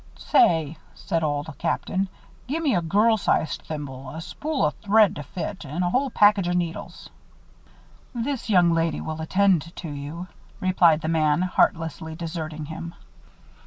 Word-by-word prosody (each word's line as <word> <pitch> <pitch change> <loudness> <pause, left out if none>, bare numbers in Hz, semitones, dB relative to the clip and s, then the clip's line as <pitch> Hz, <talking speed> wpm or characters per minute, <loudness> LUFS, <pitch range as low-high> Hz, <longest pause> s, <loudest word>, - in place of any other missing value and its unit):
"Say," 160 - +3 0.2
said 170 -4 -2
Old 145 +1 -2
Captain, 185 +3 -1 0.4
"gimme 295 0 0
a 175 - +2
girl 210 +7 +3
sized 160 -5 0
thimble, 135 -4 -7
a 155 +5 -7
spool 300 - -2
o' 150 - +2
thread 210 +3 +3
to - - -4
fit, 180 +7 -6
and 155 +5 -3
a 175 - 0
whole 270 +5 +1
package 205 -5 +4
o' - - 0
needles." 175 -2 -4 1.1
"This 240 +1 -3
young 180 -4 +5
lady 165 -1 0
will 160 0 -5
attend 180 -1 +2
to 170 - -6
you," 145 +5 -6 0.3
replied 175 -4 +4
the - - -3
man, 160 0 +2
heartlessly 160 -3 0
deserting 160 -2 -5
him. 170 +2 -7
170 Hz, 150 wpm, -24 LUFS, 160-195 Hz, 1.1 s, young